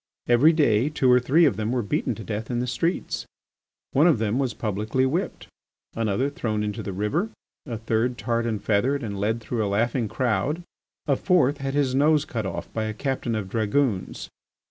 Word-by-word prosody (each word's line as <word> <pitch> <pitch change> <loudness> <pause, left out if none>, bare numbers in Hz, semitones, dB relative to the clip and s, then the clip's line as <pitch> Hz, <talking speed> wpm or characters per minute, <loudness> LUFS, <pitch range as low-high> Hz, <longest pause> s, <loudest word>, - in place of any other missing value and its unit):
Every 120 +7 +6
day 140 -5 +3
two 135 -4 +2
or 125 - +6
three 145 +7 +4
of 130 -10 +2
them 110 +1 -1
were 125 -2 0
beaten 100 - -1
to - - -8
death 110 +2 -4
in 120 - -1
the 120 - 0
streets. 130 +9 -2 0.6
One 150 +5 +4
of 165 - +4
them 110 +3 0
was 130 -4 -1
publicly 110 +4 -1
whipped, 165 +9 -2 0.5
another 115 +3 0
thrown 110 -7 -2
into 105 -1 -3
the 100 - -5
river, 105 - -1 0.4
a 115 -3 -3
third 115 +2 0
tarred 115 +2 -1
and 110 -2 -1
feathered 125 +7 +1
and 100 -3 -4
led 110 +3 0
through 115 0 -2
a 100 - -1
laughing 115 +3 0
crowd, 130 +9 -1 0.4
a 140 - +2
fourth 150 -4 +2
had 135 0 -3
his 140 -3 +1
nose 150 +2 +3
cut 110 -4 -3
off 85 - -5
by 110 -1 -1
a 110 -1 -4
captain 130 -3 -2
of 105 -3 -3
dragoons. 110 0 -1
120 Hz, 195 wpm, -25 LUFS, 110-140 Hz, 0.6 s, Every